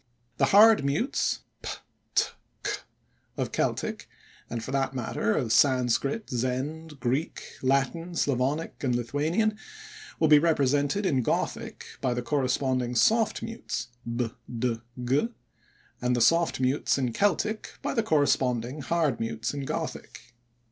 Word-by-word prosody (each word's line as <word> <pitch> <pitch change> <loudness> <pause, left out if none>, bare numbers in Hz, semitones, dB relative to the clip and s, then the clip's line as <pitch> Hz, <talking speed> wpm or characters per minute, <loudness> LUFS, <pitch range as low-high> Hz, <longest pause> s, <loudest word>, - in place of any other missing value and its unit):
The - - +4
hard 215 -3 +7
mutes 150 - 0 0.2
(p, - - -5 0.5
t, - - +5 0.4
c) - - 0 0.6
of - - -2
Celtic - - -2 0.4
(and, 115 -1 -4
for 130 - -5
that 135 -1 0
matter, 110 -3 0
of 115 -3 0
Sanscrit, 130 - +2
Zend, 135 +5 -3
Greek, 130 +6 -1 0.2
Latin, 140 +6 0
Slavonic, 140 +2 -1
and 125 -3 +1
Lithuanian) 160 - 0 0.6
will 160 - +4
be 150 -1 +8
represented 145 +3 +2
in 135 -8 +2
Gothic - - -2 0.2
by 125 -2 0
the 120 - -2
corresponding 130 -1 0
soft 220 - +3
mutes 230 - -4 0.3
(b, 120 -2 -1 0.2
d, 115 -1 -1 0.2
g), 140 - +2 0.7
and 125 0 +1
the - - +1
soft 165 +3 +3
mutes 130 +3 +1
in 125 -4 -1
Celtic 205 - 0
by - - -1
the 230 - +2
corresponding, 140 - +1
hard 155 -4 0
mutes 115 +1 -2
in 140 -1 -4
Gothic. 120 - -5
135 Hz, 135 wpm, -27 LUFS, 125-165 Hz, 0.7 s, be